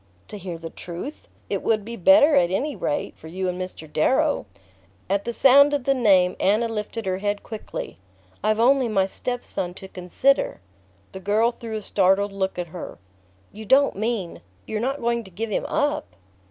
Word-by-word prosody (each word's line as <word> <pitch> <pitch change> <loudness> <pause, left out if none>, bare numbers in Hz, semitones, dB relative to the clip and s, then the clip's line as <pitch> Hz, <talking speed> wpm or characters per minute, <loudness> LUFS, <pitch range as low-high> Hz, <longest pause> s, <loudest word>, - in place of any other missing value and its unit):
"To 210 - -7
hear 180 -3 -6
the 165 0 -8
truth? 180 - -8 0.2
It - - -2
would 215 -2 0
be 235 +1 -6
better, 290 +4 +6
at 175 -11 +4
any 275 +11 -1
rate, 145 - -2
for 160 - -13
you 185 +3 -3
and 180 0 -3
Mr. 185 -3 -7
Darrow." 265 - +1 0.6
At 200 +1 0
the 235 - -1
sound 280 +4 +6
of 280 - -2
the 275 - +3
name 195 -8 +4
Anna 215 +4 +2
lifted 225 0 -4
her 185 0 -1
head 205 0 -2
quickly. 215 - -7 0.4
"I've 215 +1 +2
only 260 +2 +4
my 195 -4 +2
step 245 +5 -4
son 180 -1 -2
to 190 - -10
consider!" 190 - 0 0.5
The 190 - -8
girl 210 +5 +2
threw 230 -2 -7
a 215 - -4
startled 195 +1 +2
look 190 -1 -2
at 175 -1 -4
her. 175 +2 -8 0.5
"You 220 - -9
don't 275 +6 +4
mean 215 -3 -3 0.2
you're 215 - -3
not 270 +4 -2
going 235 0 0
to 190 - -13
give 215 +5 -5
him - - -1
up?" 300 0 -1
215 Hz, 190 wpm, -24 LUFS, 190-245 Hz, 0.6 s, better